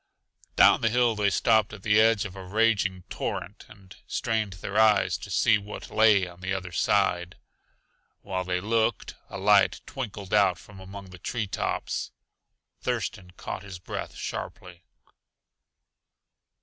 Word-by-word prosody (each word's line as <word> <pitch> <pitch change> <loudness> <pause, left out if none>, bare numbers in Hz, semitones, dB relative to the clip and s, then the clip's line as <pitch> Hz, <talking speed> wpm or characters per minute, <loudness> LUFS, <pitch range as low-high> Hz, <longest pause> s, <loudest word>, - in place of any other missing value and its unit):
Down - - +6
the 115 - +3
hill 120 0 +3
they 105 -1 +2
stopped 110 +1 +2
at 100 -3 -10
the 105 0 +4
edge 110 -2 +3
of 95 -3 -7
a 95 - -8
raging 100 -2 +1
torrent - - -5
and 95 -2 -15
strained 110 -4 -1
their 100 +3 -3
eyes 110 -1 +4
to - - -9
see 110 - +3
what 105 +1 -9
lay 105 -4 +4
on 85 0 -13
the 95 +1 -2
other 90 -1 -5
side. 90 0 +1 0.9
While 95 -2 -3
they 90 0 -1
looked, 110 +3 0 0.2
a - - -6
light 100 0 +4
twinkled 105 -7 -6
out 100 -4 +4
from 100 +2 -14
among 95 0 -10
the 90 - -12
tree 110 +4 -3
tops. 95 - -3 0.7
Thurston 90 -2 -3
caught - - -5
his 95 -3 -9
breath 90 - -6
sharply. 90 -1 -7
100 Hz, 150 wpm, -27 LUFS, 95-110 Hz, 0.9 s, Down